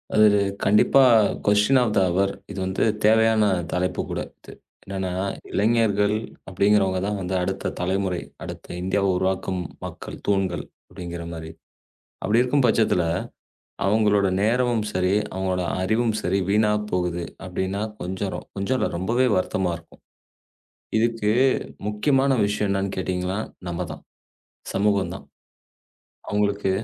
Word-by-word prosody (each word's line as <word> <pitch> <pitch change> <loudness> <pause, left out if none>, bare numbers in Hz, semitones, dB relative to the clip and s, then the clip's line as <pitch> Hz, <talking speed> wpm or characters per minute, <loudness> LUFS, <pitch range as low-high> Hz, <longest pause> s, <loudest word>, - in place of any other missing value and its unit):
அது 110 0 +7 0.4
கண்டிப்பா 105 +6 +5 0.4
question 105 +6 +4
of 115 -4 +1
the - - +5
hour 95 +2 +1 0.2
இது 100 - -6
வந்து 95 +1 -1 0.2
தேவையான 110 0 +4 0.3
தலைப்பு 90 0 -1
கூட - - -3 0.2
இது. - - -13 0.3
என்னன்னா 95 -1 -3 0.3
இளைஞர்கள் 105 -2 +2 0.4
அப்படிங்கிறவங்க 95 0 +2
தான் 105 0 -1
வந்து 90 +1 -3
அந்த - - -1
அடுத்த 95 +2 -2
தலைமுறை. 95 0 -1 0.2
அடுத்த - - -8
இந்தியாவை 95 +2 +1
உருவாக்கும் 95 0 -1 0.3
மக்கள் - - -8
தூண்கள் 95 -3 0 0.2
அப்படிங்கிற 85 -1 -7
மாரி. 80 0 -7 0.7
அப்படி 115 +3 +3
இருக்கும் 130 +1 +2
பட்சத்துல 110 -6 +3 0.8
அவங்களோட 105 -1 +3
நேரமும் 120 0 +1
சரி, 90 +1 +1 0.2
அவங்களோட 95 -1 -1 0.2
அறிவும் 110 +3 +1
சரி 95 +3 0
வீணாப் 105 0 +2
போகுது. 90 -1 -1 0.2
அப்படின்னா 95 +2 -2 0.2
கொஞ்சம் 95 +2 -4
கொஞ்சம் 100 +7 0
இல்ல - - 0
ரொம்பவே 115 +8 +1
வருத்தமா 90 -1 0
இருக்கும். 85 0 -20 1.0
இதுக்கு 115 -2 +1 0.6
முக்கியமான 135 +6 +2
விஷயம் 105 0 0
என்னன்னு 100 0 -1
கேட்டீங்கன்னா 95 +2 -2 0.3
நம்மதான் 85 0 -5 0.7
சமூகம் 100 -3 +1
தான் - - -11 1.0
அவங்களுக்கு 100 -1 0
100 Hz, 120 wpm, -24 LUFS, 95-105 Hz, 1.0 s, அது